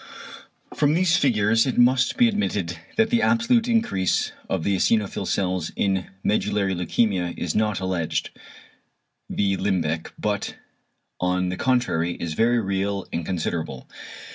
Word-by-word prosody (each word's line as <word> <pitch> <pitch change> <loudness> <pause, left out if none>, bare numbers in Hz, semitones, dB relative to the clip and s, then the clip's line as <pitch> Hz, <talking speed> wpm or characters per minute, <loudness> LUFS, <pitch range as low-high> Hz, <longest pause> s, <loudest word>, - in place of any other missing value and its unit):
From 150 0 +2
these 175 -1 +3
figures 115 -6 +3
it 130 - -2
must 125 +1 +3
be 245 - +6
admitted 100 - -2 0.2
that 225 0 +3
the 235 -1 +3
absolute 235 +1 +3
increase 225 - +1 0.2
of 95 -4 -1
the 100 +2 +1
eosinophil 100 -1 0
cells 90 -4 -1
in 95 -2 0 0.2
medullary 100 -2 +1
leukæmia 90 0 0
is 85 - -2
not 105 -1 +1
"alleged" 95 -4 -2 1.0
(v. 100 -1 +1
Limbeck) 85 -5 -1
but - - -2 0.6
on 90 0 0
the 90 - -2
contrary 120 -9 +1
is 85 -2 -4
very 120 +7 +2
real 100 -1 -2
and 85 - -2
considerable. 80 -6 -3
100 Hz, 135 wpm, -24 LUFS, 90-125 Hz, 1.0 s, be